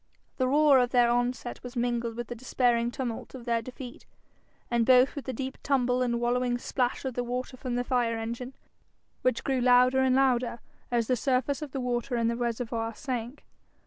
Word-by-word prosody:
The 255 - +1
roar 290 0 +5
of 245 -1 +2
their 245 -1 +4
onset 245 0 -1
was 250 +1 -9
mingled 240 -1 -1
with 240 +1 -4
the - - -5
despairing 240 -1 +1
tumult 240 0 -5
of 245 -2 -9
their 235 -1 +1
defeat, 250 +1 -10 0.6
and 235 -1 +3
both 255 +2 +5
with 285 - -6
the 260 - -2
deep 260 +2 -5
tumble 255 -2 +1
and 235 -1 0
wallowing 245 +1 +1
splash 245 +1 -2
of 260 - -2
the 245 - -2
water 250 +2 -4
from 255 -1 -4
the 245 - 0
fire 245 -3 0
engine, 235 +3 -5 0.7
which 255 -2 +1
grew 265 -2 0
louder 250 +1 +5
and 260 -1 +3
louder 250 -3 +2 0.3
as 235 -2 +1
the 255 - +1
surface 265 +4 0
of 300 -3 -6
the 270 - -3
water 245 0 -1
in 230 0 +1
the 235 - -1
reservoir 230 -1 -2
sank. 250 -1 -5
245 Hz, 195 wpm, -28 LUFS, 235-255 Hz, 0.7 s, roar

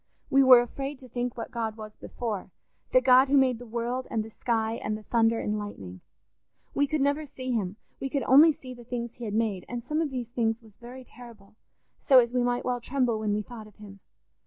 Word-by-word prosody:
We 275 - +5
were 255 -2 +8
afraid 275 +3 -6
to 255 - -13
think 245 0 -4
what 230 - -6
God 225 -2 -3
was 215 -1 -9
before—the 230 - -3
God 255 - +6
who 280 +1 +3
made 255 -3 +3
the 245 - -10
world 240 +3 -3
and 220 - -1
the 220 - -11
sky 225 0 -1
and 215 0 -2
the 215 - -13
thunder 230 0 +2
and 210 0 -2
lightning. 95 - -8 0.7
We 285 - +2
could 305 0 -1
never 285 +2 +1
see 260 -3 -6
him; 205 -5 -1 0.2
we 270 - -3
could 275 0 -1
only 295 +5 +7
see 255 -3 -10
the 240 -1 -13
things 235 -1 -5
he 240 - -8
had 210 -1 -3
made; 215 -5 0
and 240 -1 -5
some 305 +5 -1
of 315 - -1
these 250 -3 -5
things 230 -1 -1
was 215 -3 -18
very 250 +2 -11
terrible, 230 -5 -15 0.4
so 270 -4 +5
as 240 -1 +4
we 250 - +2
might 245 0 0
well 245 -1 -1
tremble 245 -3 0
when 210 -1 0
we 210 - -2
thought 220 -1 -10
of 210 - -19
him. 200 -2 -13
240 Hz, 230 wpm, -27 LUFS, 220-255 Hz, 0.7 s, were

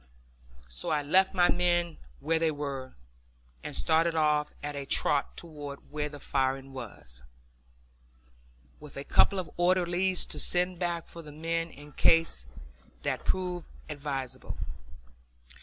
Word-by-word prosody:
So 115 - -5
I 150 -2 +1
left 190 +6 +5
my 175 -1 +6
men 175 -1 +1 0.2
where 165 - +1
they 165 0 +3
were 140 -3 -4 0.7
and - - -5
started 160 - +3
off 150 -1 +2
at 145 0 -3
a 140 -1 -5
trot 140 +1 +1
toward 145 -4 -8
where 150 0 -2
the 145 0 -9
firing 135 0 -1
was, 95 - -9 1.6
with 150 -2 -11
a 140 - -4
couple 195 - +4
of 185 - -3
orderlies 180 +1 +2
to - - -4
send 180 0 +2
back 170 -2 -1
for 170 - -10
the 150 -2 -11
men 165 +2 -2
in 145 -1 -13
case 165 - +4 0.6
that - - -1
proved 180 -2 -1 0.2
advisable. 135 -3 -4
155 Hz, 135 wpm, -30 LUFS, 140-175 Hz, 1.6 s, my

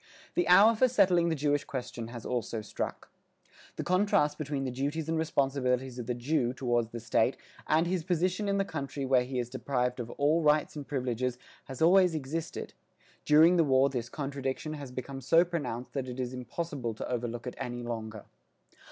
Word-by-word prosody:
The 350 -1 +1
hour 225 -1 +7
for 255 +4 +4
settling 180 -8 +3
the 160 - 0
Jewish 145 0 +1
question 120 -3 -5
has 120 -1 -8
also 120 -2 -2
struck. 105 - -5 0.6
The - - -3
contrast 180 -5 +2
between 145 -2 -2
the 130 - -2
duties 145 +5 -2
and 165 - 0
responsibilities 135 -5 0
of 120 - -6
the 125 - -1
Jew 125 0 0
toward 120 -3 0
the 115 - -5
state 110 -1 +1 0.3
and 160 +2 +3
his 175 -1 -1
position 185 +4 0
in 200 - +1
the 195 - +1
country 140 -4 -4
where 130 -1 +4
he 130 0 -4
is 120 -1 -1
deprived 125 0 -2
of 120 -1 -5
all 150 +4 +3
rights 150 -1 +2
and 145 -2 -7
privileges 125 -2 -2 0.3
has 135 +3 -3
always 180 0 +5
existed; 155 +3 -4 0.5
during 160 +4 +6
the 165 - +5
war 135 -1 +3
this 120 -3 -3
contradiction 140 +1 -4
has 140 -4 -7
become 135 +2 -6
so 165 +7 +5
pronounced 130 -8 -4
that 130 -2 -3
it 125 +1 -7
is 125 0 -3
impossible 125 -1 -4
to - - -5
overlook 120 -1 -3
it 125 - -4
any 120 0 -4
longer. 110 -3 -5
135 Hz, 185 wpm, -30 LUFS, 125-160 Hz, 0.6 s, hour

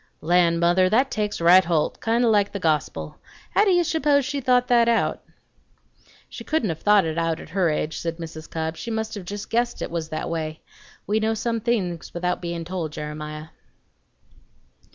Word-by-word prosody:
Land, 170 0 +3
mother! 175 +2 +3
that 255 +6 +2
takes 210 -1 -2
right 175 +3 +7
holt, 165 -3 0
kind 230 +2 +1
o' - - +4
like 205 -2 +2
the 200 - -4
gospel. 155 -4 -1 0.3
How 410 - +4
do - - +3
you 350 -2 +4
suppose 290 -4 +2
she 285 0 -3
thought 250 -1 +3
that 235 -2 +4
out?" 230 - +1 1.1
"She - - -9
couldn't 310 -10 0
have 160 -1 -3
thought 205 -3 +4
it 160 +1 -2
out 165 -1 -1
at - - -11
her 180 0 +1
age," 155 +1 -2
said 165 -1 -4
Mrs. 160 -2 -8
Cobb; 160 0 -3
"she 235 - -6
must 220 -1 -3
have 200 -4 -7
just 205 +2 -7
guessed 240 +1 0
it - - -4
was 165 -2 -3
that 155 -1 -4
way. 155 -1 -4 0.4
We 215 +1 +1
know 220 +1 0
some 230 +1 -1
things 195 -9 -2
without 180 +1 -1
bein' 170 -1 -4
told, 170 -3 -4
Jeremiah." 150 +1 -6
180 Hz, 195 wpm, -23 LUFS, 165-230 Hz, 1.1 s, right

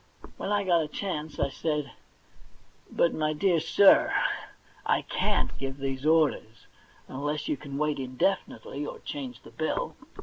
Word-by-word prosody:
When 200 - -3
I 205 -1 +2
got 175 -3 +3
a 155 - -2
chance 155 -3 -4
I 140 - +2
said: 150 -1 -2 1.0
'But, 170 - +2
my 155 0 0
dear 170 +2 +2
sir, 180 +5 +6 0.7
I - - +2
can't - - 0
give 135 0 -4
these 135 +1 -2
orders, 155 -8 +2 0.4
unless 145 +3 -3
you - - +1
can 140 0 -7
wait 150 -1 0
indefinitely, 135 +2 -1
or - - -5
change 265 -4 -7
the - - -13
bill.' - - -2
150 Hz, 145 wpm, -28 LUFS, 140-170 Hz, 1.0 s, sir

